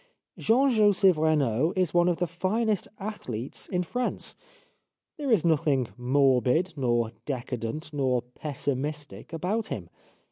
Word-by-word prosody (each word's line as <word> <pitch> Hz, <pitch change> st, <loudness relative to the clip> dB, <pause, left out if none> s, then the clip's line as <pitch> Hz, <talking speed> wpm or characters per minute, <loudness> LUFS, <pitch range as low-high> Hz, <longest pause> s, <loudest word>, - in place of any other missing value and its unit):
Jean 260 Hz, +5 st, +4 dB
Joseph 205 Hz, -4 st, +5 dB
Renaud 155 Hz, -2 st, +2 dB
is 185 Hz, -4 st, +1 dB
one 175 Hz, 0 st, +4 dB
of 175 Hz, -, 0 dB
the 175 Hz, -, +1 dB
finest 195 Hz, +5 st, 0 dB
athletes 135 Hz, -, -5 dB
in 180 Hz, 0 st, -1 dB
France. 245 Hz, +8 st, -2 dB, 0.8 s
There 290 Hz, -3 st, -3 dB
is 215 Hz, -9 st, +3 dB
nothing 145 Hz, -6 st, +2 dB
morbid, 130 Hz, +5 st, +2 dB
nor 120 Hz, -5 st, +1 dB, 0.2 s
de 130 Hz, -4 st, -2 dB
cadent, 125 Hz, +7 st, -5 dB
nor 130 Hz, -4 st, +1 dB
pessimistic 145 Hz, +3 st, -4 dB
about 185 Hz, +7 st, -1 dB
him. 90 Hz, -6 st, -6 dB
155 Hz, 130 wpm, -27 LUFS, 130-185 Hz, 0.8 s, Joseph